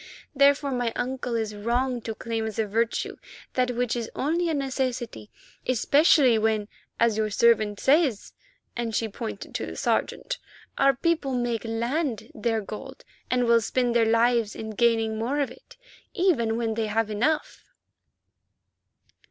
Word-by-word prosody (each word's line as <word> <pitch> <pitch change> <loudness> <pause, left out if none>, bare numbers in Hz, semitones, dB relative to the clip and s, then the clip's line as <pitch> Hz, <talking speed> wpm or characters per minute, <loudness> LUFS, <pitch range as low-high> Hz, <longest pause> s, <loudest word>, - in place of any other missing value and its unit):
Therefore, 280 +1 +4
my 245 -2 0
uncle 250 -1 -2
is 220 -2 -2
wrong 240 +4 -1
to 225 0 -5
claim 225 0 -3
as 220 - -6
a 220 - +1
virtue 225 +3 -1 0.4
that 250 -1 +1
which 245 0 0
is 235 -2 -3
only 335 +5 0
a - - 0
necessity, 255 - -3 0.4
especially 260 -1 +4
when, 215 -1 +1 0.3
as 230 -2 +3
your 215 -1 +1
servant 215 -1 +3
says," 275 -6 +2 0.4
and 230 -2 -2
she 225 - 0
pointed 220 -1 -7
to - - -3
the - - -7
Sergeant, - - -1 0.4
"our 275 -1 +4
people 300 -3 0
make 240 -2 -1
land 235 +3 -2
their 225 0 -1
gold 265 +6 -9 0.2
and 250 0 +2
will 235 0 +5
spend 245 +2 0
their 230 -1 +4
lives 230 -1 +2
in 220 0 -6
gaining 225 0 +1
more 255 +6 -1
of 280 - 0
it, - - -16 0.4
even 285 - +2
when 230 -1 -1
they 220 0 -1
have 215 0 0
enough." 245 +9 -1
235 Hz, 150 wpm, -26 LUFS, 220-265 Hz, 0.4 s, will